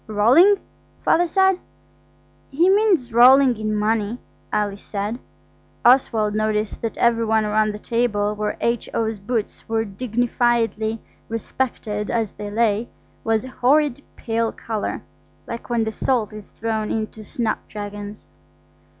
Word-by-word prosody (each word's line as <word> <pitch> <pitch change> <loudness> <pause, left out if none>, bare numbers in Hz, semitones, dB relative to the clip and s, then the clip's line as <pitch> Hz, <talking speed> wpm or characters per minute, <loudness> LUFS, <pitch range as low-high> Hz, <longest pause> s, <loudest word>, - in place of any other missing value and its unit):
"Rolling?" 250 - +5 0.5
Father 350 +1 +4
said. 380 +1 +3 0.9
"He 325 +6 +2
means 385 - +2
rolling 255 +2 +7
in 215 0 -2
money," 215 +1 0 0.3
Alice 205 -1 -1
said. 210 +4 -4 0.7
Oswald 230 -4 +4
noticed 215 0 -1
that 230 - -3
every 235 -1 +3
one 220 -1 +2
round 215 0 +2
the 210 - -6
table 210 -2 0
where 210 0 -3
H.O.'s 225 -2 -1
boots 215 +2 -4
were 225 0 0
dignifiedly 230 0 0 0.3
respected 220 -2 -3
as 225 -4 -1
they 205 0 -6
lay, 220 +1 +1 0.3
was 225 +1 0
a - - -8
horrid 275 +2 +2
pale 230 -1 -1
colour, 220 -2 -4 0.4
like 235 +1 -7
when 235 -2 +1
the 220 - -2
salt 220 -1 0
is 210 -1 -10
thrown 220 -1 -3
into 220 0 -4
snapdragons. 205 -2 -5
225 Hz, 125 wpm, -22 LUFS, 210-245 Hz, 0.9 s, rolling